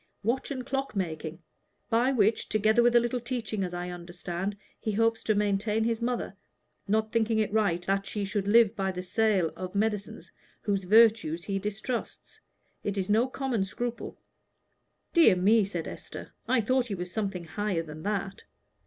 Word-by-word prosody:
"Watch 235 +5 0
and 260 -3 -4
clock 270 -2 -2
making, 165 -3 -4 0.5
by 240 +4 +3
which, 220 -3 +2
together 215 +2 +3
with 240 0 +4
a - - +9
little 240 +1 -1
teaching, 230 -4 -3
as 180 - -3
I 175 0 -4
understand, 175 +2 -5 0.2
he 215 - -2
hopes 225 +2 +2
to 215 - +2
maintain 210 +2 +1
his 230 0 0
mother, 235 -4 -2 0.5
not 215 +2 +1
thinking 225 -1 +1
it 215 -1 0
right 195 -5 +1
that 195 +1 0
he 205 -2 -3
should 200 0 -2
live 225 0 +5
by 195 -3 -1
the 180 0 -5
sale 190 -3 +2
of 185 +1 -6
medicines 210 -1 -2 0.3
whose 195 -2 0
virtues 210 -5 +4
he 195 0 -2
distrusts. 210 +4 -5 0.4
It 205 -1 -2
is 190 +1 -1
no 225 +4 +4
common 260 -5 -1
scruple." 240 +5 -5 1.0
"Dear 325 - +7
me," 205 +4 +4
said 175 -4 -4
Esther, - - -9
"I 255 -2 +3
thought 255 +3 +1
he 205 - -3
was 180 0 -5
something 195 -5 -2
higher 190 0 -2
than 155 -1 -9
that." 195 0 -3
210 Hz, 170 wpm, -28 LUFS, 190-230 Hz, 1.0 s, a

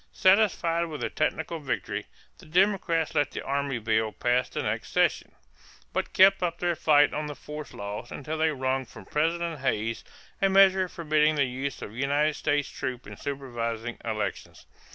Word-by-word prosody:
Satisfied 185 -4 +3
with 155 -3 -7
the - - -2
technical 160 +1 -1
victory, 140 -3 -3 0.3
the - - -15
Democrats 175 -2 +2
let 145 - +2
the - - -6
army 140 -1 -1
bill 110 -1 0
pass 125 +3 0
the - - -3
next - - -2
session, - - +1 0.6
but - - -2
kept 195 0 +6
up 175 -2 -1
their 175 -1 0
fight 145 -2 +4
on 150 0 -2
the 150 - -6
force 150 +2 -8
laws 105 +4 -6
until 155 +3 -5
they 160 0 +3
wrung 130 -2 -1
from 125 - -13
President 165 +1 -1
Hayes 115 -4 -1 0.4
a 195 - +4
measure 190 -1 +5
forbidding 155 -2 +2
the 140 -2 +3
use 130 +2 -4
of 105 - -8
United 145 +4 +1
States 145 -1 0
troops 130 -1 -5
in - - -9
supervising 120 -4 -4
elections. 110 -2 -4
145 Hz, 170 wpm, -27 LUFS, 125-165 Hz, 0.6 s, kept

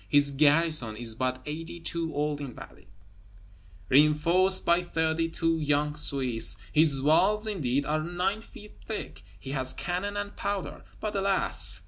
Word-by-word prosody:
His 145 0 +4
garrison 150 -4 +3
is 115 -1 -4
but 130 +2 -2
eighty 165 +3 -6
two 165 0 -3
old 145 0 -1
Invalides, 125 -7 -10 1.0
reinforced 165 +7 +3
by 170 +1 +4
thirty 165 -1 -1
two 165 0 0
young 150 0 0
Swiss; 130 -8 +1 0.2
his 150 -3 +3
walls, 195 +8 +3
indeed, 140 - -1
are 155 +1 0
nine 180 +6 -1
feet 210 -1 -13
thick; 220 - -5 0.2
he 135 - -7
has 130 -2 0
cannon 195 +3 -3
and 205 0 -5
powder, 200 -2 -4 0.2
but 215 -1 -4
alas! 195 -1 +1
160 Hz, 140 wpm, -28 LUFS, 145-180 Hz, 1.0 s, His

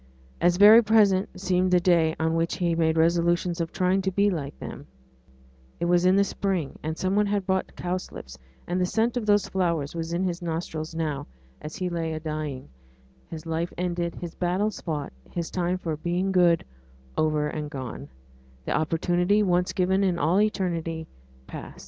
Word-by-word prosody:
As 175 0 +3
very 215 +4 +9
present 205 -4 +3
seemed 185 -1 +1
the 180 -1 +4
day 170 -3 +3
on 160 0 +1
which 165 0 0
he 175 -2 0
made 160 -1 +1
resolutions 170 +1 +2
of 165 - -3
trying 185 +1 +1
to 190 - 0
be 200 +2 +2
like 145 -5 -4
them; - - -8 0.9
it - - -1
was 175 +1 +3
in 185 - +5
the 200 - +5
spring, 190 -7 -2
and 160 +1 -4
some 185 +1 0
one 210 0 +3
had 200 -1 -1
brought 190 0 0
in - - -22
cowslips; 175 - -5 0.3
and 180 +1 -1
the - - +3
scent 225 +5 0
of 235 -3 -2
those 205 -1 +3
flowers 170 -7 -1
was 165 0 -4
in 175 +2 0
his 180 -1 -2
nostrils 160 -1 -4
now, 155 -4 -2 0.3
as 155 - -7
he 185 -2 -2
lay 165 -2 -2
a 155 - -3
dying 150 - -5 0.6
his 160 -1 -8
life 165 +1 -2
ended, 175 -1 -2
his 170 -1 -7
battles 190 +4 -1
fought, 150 - -4 0.2
his 170 -2 -4
time 180 0 0
for 165 -4 -3
'being 175 +5 -1
good' 175 -3 +4 0.5
over 155 -1 +1
and 150 0 -4
gone 130 - -7 0.6
the - - -3
opportunity, 175 +6 +2
once 180 -2 +1
given 190 +1 +1
in 185 -3 +1
all 170 +6 +3
eternity, 170 -6 -1 0.4
past. - - -9
175 Hz, 185 wpm, -26 LUFS, 160-185 Hz, 0.9 s, very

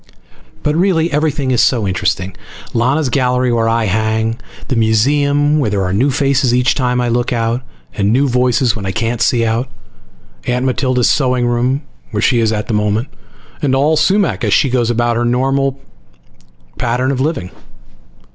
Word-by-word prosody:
But 150 0 0
really, 170 -2 +1
everything 145 -2 0
is 125 - +3
so 115 -6 +2
interesting. 95 0 -2 0.4
Lana's 130 +6 +1
gallery 125 -1 +1
where 115 -1 +1
I 115 0 +1
hang, 110 +3 -1 0.3
the 130 - -1
museum 145 +7 +2
where 125 -7 0
there 100 -2 -1
are 90 0 -2
new 125 +8 +2
faces 135 -2 +1
each 125 0 +2
time 125 -2 0
I 125 - 0
look 120 +1 0
out, 115 +1 -1 0.3
and 100 0 0
new 135 +4 +2
voices 125 -2 +1
when 105 - -6
I - - -1
can't 115 +5 -2
see 115 -1 +2
out, 115 +3 -1 0.8
Aunt 125 +1 0
Matilda's 130 -1 +1
sewing 125 -3 +1
room 125 +4 0 0.3
where 105 - -3
she 120 +2 +2
is 110 -1 +1
at 105 0 -2
the - - -2
moment, 105 +4 0 0.5
and 135 -2 +1
all 145 +4 +2
Sumac 165 - +1
as 105 -2 +1
she 135 - +2
goes 120 -2 +1
about 120 0 0
her 120 - 0
normal 135 +3 0 1.0
pattern 125 +3 0
of 130 -1 -2
living. 135 - -2
125 Hz, 175 wpm, -15 LUFS, 115-135 Hz, 1.0 s, is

